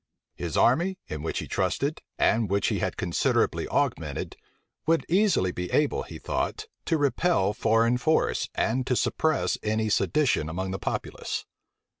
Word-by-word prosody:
His 85 -2 -4
army, 175 +10 +3
in 75 -1 -4
which 80 - -3
he - - -3
trusted, 145 +3 -1 0.2
and 110 -3 +2
which 100 0 +1
he - - -1
had - - -2
considerably - - +1
augmented, - - -1 0.5
would 165 0 +2
easily 185 - +3
be 90 0 -4
able, 150 -1 +1
he - - -8
thought, 430 - -2 0.2
to 165 - +2
repel 145 - +2
foreign 115 +3 +2
force, 160 +4 +1
and 125 +3 0
to 125 - +2
suppress 160 +5 +1
any 110 0 0
sedition 130 - +2
among 95 +3 -3
the 95 - -4
populace. - - -3
120 Hz, 150 wpm, -27 LUFS, 95-155 Hz, 0.5 s, army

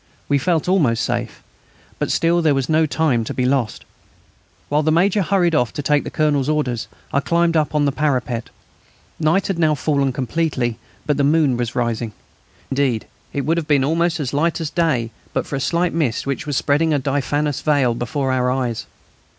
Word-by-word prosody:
We 140 -1 +2
felt 165 +2 0
almost 150 -12 +2
safe. - - -3 0.6
But - - -1
still, 170 +1 +2
there 155 -3 +3
was 135 -1 -1
no 160 0 +3
time 145 -6 +1
to - - -5
be 125 - 0
lost. 125 -5 0 0.8
While 150 +1 +2
the 155 +1 +1
Major 190 +5 +3
hurried 180 -2 +2
off 125 -6 +2
to 145 - -4
take 145 +1 +2
the - - -5
Colonel's 145 -3 +1
orders 135 -7 -1 0.3
I 140 - +3
climbed 170 +3 +1
up 155 -1 +1
on 150 -1 +3
the 140 - +2
parapet. 130 -5 -1 0.7
Night 165 +5 +2
had 190 -4 -2
now 155 -2 +3
fallen 140 -1 +1
completely, 130 -2 -1 0.3
but 150 -2 +1
the 140 - +2
moon 145 -2 +3
was 120 0 -3
rising. 115 -2 -1 0.6
Indeed, 135 -5 0 0.3
it 140 - -2
would 160 +5 0
have 160 -3 -2
been 145 -3 +3
almost 165 +3 +1
as 140 -3 -3
light 165 +4 +1
as 160 -2 -3
day 130 -10 0 0.2
but - - -1
for - - -4
a - - -1
slight 170 +5 0
mist 150 -9 0
which 140 +3 -3
was 145 -3 -1
spreading 150 +2 +2
a - - +3
diaphanous 145 +1 -1
veil 140 -6 +2
before 135 +3 -2
our 125 -1 +1
eyes. 125 -3 -2
145 Hz, 195 wpm, -20 LUFS, 130-160 Hz, 0.8 s, there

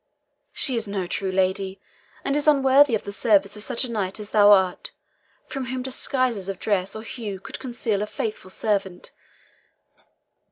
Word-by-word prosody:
She 265 - -1
is 225 -2 -1
no 200 -2 -2
true 190 +2 -2
lady, 190 +1 0 0.5
and 275 - +1
is 295 +1 0
unworthy 275 -2 +5
of 215 - -3
the 200 - -6
service 200 -2 +3
of 210 - -7
such 235 - 0
a 250 - -3
knight 195 -3 -2
as 210 -1 -9
thou 205 -1 +6
art, 190 -3 +3 0.6
from 270 -2 -5
whom 255 +1 -4
disguises 255 -6 -1
of 195 - -3
dress 195 -1 -1
or 220 - -6
hue 215 -4 -6
could - - -9
conceal 235 -5 -2
a 210 - -2
faithful 210 -3 -5
servant. 195 -2 -2
210 Hz, 170 wpm, -24 LUFS, 195-250 Hz, 0.6 s, thou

